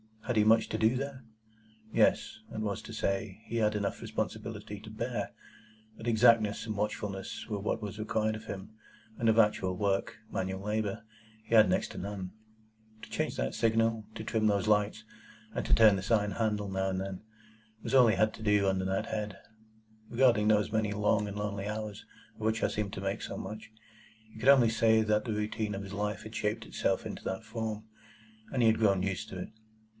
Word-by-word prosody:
Had 125 -3 -1
he 105 - +6
much 110 +1 +5
to - - -1
do 110 +3 +3
there? 135 -1 -4 0.7
Yes; - - +2
that 110 - -5
was 105 -2 -2
to 115 - -9
say, 100 -1 -2
he 115 - -3
had 105 -1 +2
enough 100 -1 -2
responsibility 105 -1 -4
to 110 +1 -11
bear; 115 +3 -3 0.7
but 115 - -7
exactness 110 -2 +4
and 110 -2 -3
watchfulness 100 -2 -3
were 105 -2 -2
what 105 +3 -2
was 105 0 -6
required 110 0 0
of 110 - -9
him, 95 +1 -6 0.5
and 115 - +1
of 110 0 +4
actual 105 -4 +3
work—manual 100 -1 -2
labour—he 110 +1 -5
had 110 -1 +7
next - - +1
to - - -9
none. 95 -1 -5 0.7
To - - -10
change - - -1
that 60 +1 -1
signal, 115 -1 +1
to 110 - -5
trim 110 -1 +1
those 100 0 +1
lights, 105 +1 +2 0.5
and - - -2
to - - +2
turn 110 -3 +7
this 95 +4 -4
iron 105 -2 +3
handle 105 -1 -1
now 95 0 0
and 95 0 -1
then, 95 -1 -5 0.6
was - - -4
all 130 -3 +7
he 110 - +3
had 110 0 +2
to - - -12
do 105 -2 +3
under 95 -1 0
that 95 +4 -1
head. 105 -3 -3 0.7
Regarding 120 -4 +4
those 105 -1 +3
many 110 -1 +1
long 105 0 +2
and 100 0 -6
lonely 100 -1 -3
hours 105 -1 -5 0.3
of - - -15
which 110 +1 0
I - - +3
seemed 105 -2 -3
to 95 - -5
make 100 +3 -2
so - - -5
much, 110 0 -7 0.6
he 110 - -12
could 135 - +3
only 130 -5 +7
say 110 0 +4
that 105 +1 +1
the 115 - -1
routine 105 0 -2
of 100 - -5
his 100 0 -8
life 105 +1 -2
had 110 +1 -9
shaped 105 -1 -2
itself - - -1
into - - -6
that 95 +3 -3
form, 110 -1 -4 0.7
and 125 -3 +1
he 115 - +7
had 110 - +2
grown 100 -4 +3
used 100 +3 -2
to 95 - -7
it. 90 - -5
105 Hz, 200 wpm, -31 LUFS, 100-110 Hz, 0.7 s, had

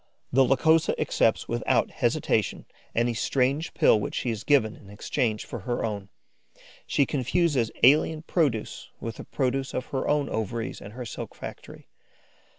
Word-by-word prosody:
The 135 +1 +6
Lycosa 160 +5 +3
accepts - - +1
without - - +1
hesitation - - 0 0.3
any 120 +1 +2
strange 135 +6 0
pill 110 - +5
which - - -4
she 120 - -1
is, 110 -1 -5
given 125 -7 +3
in 100 - -16
exchange 110 +1 -2
for 120 - -6
her 120 +5 -2
own; 100 -3 -4 0.8
she 140 - +2
confuses 140 -3 +1
alien 155 +4 +5
produce 145 -11 -1
with 115 -1 -6
the - - -7
produce 135 0 -2
of 130 - -2
her 135 - -1
ovaries 115 -6 -1
and 100 +1 -10
her 125 +1 -6
silk - - -7
factory. - - -10
125 Hz, 150 wpm, -26 LUFS, 110-140 Hz, 0.8 s, The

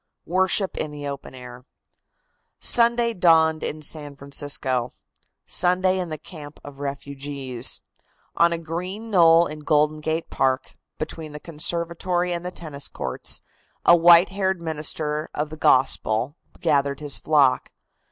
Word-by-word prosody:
WORSHIP 190 +2 +1
IN 155 - -2
THE 145 -1 -7
OPEN 140 -1 -7
AIR. 125 0 -11 1.0
Sunday 235 0 +3
dawned 160 -4 +4
in 155 0 -4
San 145 -1 +1
Francisco; 140 -3 -2 0.6
Sunday 185 +1 +2
in 180 -2 -3
the 155 - -4
camp 150 -2 -11
of 145 -1 -11
the - - -11
refugees. 140 -2 -2 0.5
On 170 0 +4
a 170 - -1
green 180 +7 -6
knoll 170 -3 +6
in 155 0 -7
Golden 150 0 +1
Gate 160 +2 -3
Park, 130 -1 0 0.2
between 155 -2 -6
the 150 - -7
conservatory 170 +3 -2
and 170 0 -4
the 180 - -3
tennis 155 -6 -6
courts, - - -4 0.4
a 175 - +8
white 170 +1 +7
haired 190 -1 -1
minister 155 -1 -2
of 150 +1 -2
the - - -6
Gospel 130 -2 +2 0.2
gathered 140 -4 +1
his 145 -2 -1
flock. 145 -4 +2
155 Hz, 140 wpm, -23 LUFS, 140-175 Hz, 1.0 s, a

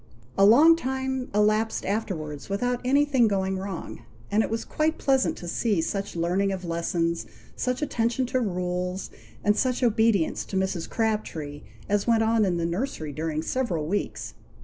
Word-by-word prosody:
A 195 - +5
long 305 +10 +8
time 265 -3 -3
elapsed 215 +2 +1
afterwards 180 -9 -3
without 245 +5 -1
anything 270 -2 +3
going 190 -2 0
wrong; 190 -3 -6 0.3
and 210 +2 +4
it - - -1
was 225 0 -2
quite 310 +1 0
pleasant 270 -2 +2
to 175 - -8
see 205 +2 0
such 195 +4 -2
learning 180 +4 +1
of 185 -1 -4
lessons, 170 0 -1 0.3
such 250 +3 -1
attention 240 -1 0
to 255 +1 0
rules, 180 -3 -2 0.3
and 210 0 +3
such 255 +2 0
obedience 220 -6 +2
to 195 - -3
Mrs. 190 -3 -1
Crabtree, 170 -10 -2 0.3
as 205 +1 0
went 225 -1 +4
on 225 -1 +3
in 180 -3 0
the 170 - -1
nursery 170 - -3
during 155 +1 -2
several 180 -10 -1
weeks. 200 +6 -3
205 Hz, 160 wpm, -26 LUFS, 175-245 Hz, 0.3 s, long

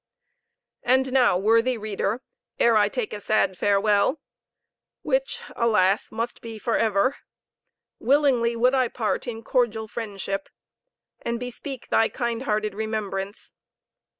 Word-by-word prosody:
And 260 +1 +2
now, 245 -8 +4
worthy 230 +5 +3
reader, 215 +2 -2 0.4
ere 235 -1 +4
I 205 -1 +4
take 245 -1 -3
a 210 - -5
sad 200 -2 +1
farewell, 205 - +2 0.8
which, - - -1
alas! 210 -4 +2
must 230 +2 -4
be 225 -1 -7
for 230 +1 -1
ever 220 +4 +2 0.8
willingly 255 -3 +3
would 250 +3 +3
I 260 -2 +3
part 230 -1 -2
in 225 -1 -5
cordial 225 -3 0
fellowship, 200 -3 -4 0.7
and 235 0 -2
bespeak 250 +2 -7
thy 225 - +3
kind 235 -1 -2
hearted 215 -4 -1
remembrance. 205 -2 -4
225 Hz, 125 wpm, -25 LUFS, 210-250 Hz, 0.8 s, now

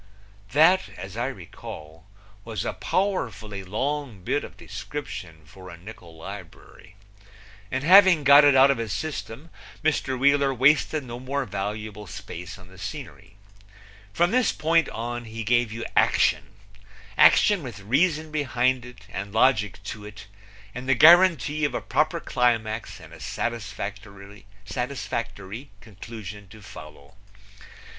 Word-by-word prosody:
That, 160 0 +5
as 95 +2 -8
I 120 +2 -1
recall, 80 - -10 0.4
was 110 -2 -5
a - - -2
powerfully 115 - -2
long 125 +1 -3
bit - - -1
of - - -11
description 95 - -7
for 95 +4 -13
a 85 - -10
nickul 90 -3 -13
librury, 95 +1 -11 0.7
and 130 +4 -2
having 185 -2 +7
got 140 +2 +8
it 145 -2 +6
out 135 +1 +7
of 135 - -2
his 110 -4 -3
system 155 +1 -6 0.3
Mr. 145 -4 0
Wheeler 140 0 +3
wasted 145 +3 +3
no 120 -1 -8
more 135 +2 -3
valuable 105 0 -5
space 90 -1 -8
on 90 -2 -15
the 95 0 -16
scenery. 95 +1 -8 0.8
From 175 - +2
this 255 -1 +3
point 165 +1 +1
on 120 +1 -5
he 110 0 -6
gave 120 0 +2
you 115 +1 -5
action - - +3 0.7
action 205 -4 +5
with 120 -8 -8
reason 155 - +1
behind 130 -4 0
it 125 -5 -14
and 100 0 -6
logic 105 -6 +2
to 105 0 -7
it 105 -2 -10 0.5
and 130 +1 -6
the 135 - +5
guaranty 160 0 +6
of 145 - 0
a - - 0
proper 155 +2 0
climax 115 -5 -1
and - - -14
a - - -12
satisfactory 100 -2 -6 1.3
conclusion 105 -1 -10
to 105 +2 -15
follow. 75 -4 -12
115 Hz, 135 wpm, -25 LUFS, 100-140 Hz, 1.3 s, got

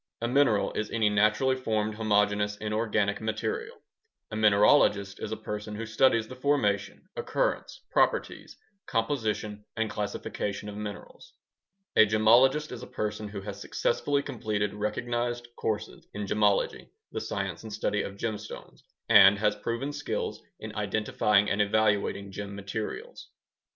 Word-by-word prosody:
A 115 - -1
mineral 125 -5 +3
is 105 - -2
any 110 -2 +2
naturally 105 +6 +3
formed 110 -4 -1
homogeneous 105 -1 +1
inorganic 105 -1 0
material. 435 - -3 0.5
A - - -4
mineralogist 105 -1 +4
is 105 - -4
a 110 - -2
person 105 0 -5
who 115 +2 -4
studies 110 0 +3
the 130 - -9
formation, 130 -7 0
occurrence, - - -2
properties, - - 0 0.3
composition, 110 -4 -1
and 110 -1 0
classification 105 0 -4
of 105 - -8
minerals. 105 - -8 0.6
A 110 - +7
gemologist 120 +8 +4
is 120 - -7
a 125 - -8
person 105 0 -3
who 100 -1 -6
has 100 0 -7
successfully 140 +7 0
completed 105 -6 -2
recognized 120 +3 -2
courses 110 -2 -3
in 105 0 -3
gemology 105 0 +1 0.2
(the - - -3
science - - -3
and 110 - -9
study 105 0 -1
of 100 - -6
gemstones) 110 -1 -6 0.3
and 100 0 +8
has 105 0 +1
proven 120 +7 -3
skills 145 0 -3 0.2
in - - -8
identifying 105 -1 +2
and 100 +1 +1
evaluating 105 -1 +1
gem 100 +1 -6
materials. 100 +2 -6
105 Hz, 135 wpm, -28 LUFS, 105-115 Hz, 0.6 s, and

